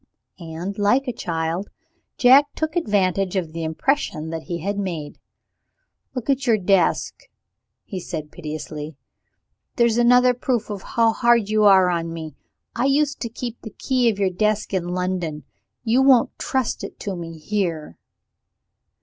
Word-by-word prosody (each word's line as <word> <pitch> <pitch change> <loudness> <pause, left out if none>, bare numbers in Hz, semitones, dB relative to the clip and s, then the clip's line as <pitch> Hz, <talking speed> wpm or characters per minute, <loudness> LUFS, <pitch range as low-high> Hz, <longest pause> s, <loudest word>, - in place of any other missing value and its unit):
And, 170 +4 -6
like 250 +7 +2
a 250 - -1
child, 165 +1 -3 0.5
Jack 265 +3 +7
took 315 +1 -2
advantage 195 - +1
of 170 -4 -2
the 165 0 -4
impression 160 - -1
that 165 -1 -5
he 175 -2 -3
had 200 +4 -3
made. 170 -7 -5 1.0
"Look 250 -3 -4
at 275 -1 0
your 225 -2 +4
desk," 195 -3 +1 0.6
he 190 - -5
said 155 -4 -6
piteously; 155 -1 -7 0.8
"there's 235 -2 +3
another 250 +1 +5
proof 245 -2 -1
how 225 +3 +1
hard 235 -3 +3
you 215 0 +3
are 190 -3 +6
on 165 -1 -2
me. 160 -2 -7 0.4
I 240 - 0
used 280 +1 +1
to 235 - -4
keep 235 0 -6
the 220 - -10
key 255 -3 +2
of 210 - -2
your 195 -2 +1
desk 210 +3 0
in 180 -2 -1
London. 180 -4 -2 0.4
You 240 +2 +3
won't 265 -3 +4
trust 260 -3 -1
it - - -8
to 200 -2 -3
me 165 -1 -7
here." 165 - -3
200 Hz, 150 wpm, -22 LUFS, 170-240 Hz, 1.0 s, Jack